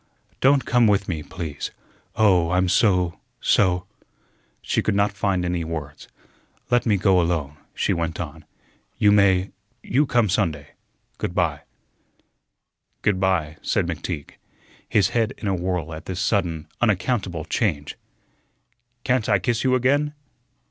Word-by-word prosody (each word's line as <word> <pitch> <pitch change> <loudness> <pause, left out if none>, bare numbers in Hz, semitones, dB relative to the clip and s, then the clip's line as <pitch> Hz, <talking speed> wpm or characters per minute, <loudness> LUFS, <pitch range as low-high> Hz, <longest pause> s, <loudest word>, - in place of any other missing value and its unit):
Don't 135 0 +4
come 120 -2 +4
with 100 -1 +2
me, 80 -4 -3
please. 80 -4 -6 0.5
Oh, 95 -6 +4
I'm 90 +1 +2
so 90 -3 +2 0.2
so," 90 -2 +2 0.7
she - - 0
could - - 0
not 100 0 +2
find 95 -3 -1
any 90 -1 -1
words. 75 -3 -6 0.6
"Let 120 0 +3
me 105 -3 +3
go 95 -1 +3
alone," 80 -4 -2 0.2
she - - +1
went 85 -1 -3
on. 75 -4 -6 0.5
"You 105 - +4
may 100 -2 +3 0.3
you 140 +4 +1
come 120 -4 +3
Sunday. 80 -7 -1 0.5
Good 90 - -3
by." 85 -7 0 1.4
"Good 100 -3 +2
by," 85 -5 0
said - - 0
McTeague, 80 -2 -5 0.6
his 100 -3 +3
head 115 -2 0
in 105 - -5
a 100 - +1
whirl 90 -3 -2
at 80 +1 -8
this 95 -1 -4
sudden, 90 -6 0
unaccountable 95 -6 0
change. 80 -8 -1 1.1
"Can't 125 -4 +1
I 100 - +5
kiss 115 +5 -1
you 130 -1 +3
again?" 145 +4 +1
95 Hz, 140 wpm, -23 LUFS, 85-105 Hz, 1.4 s, I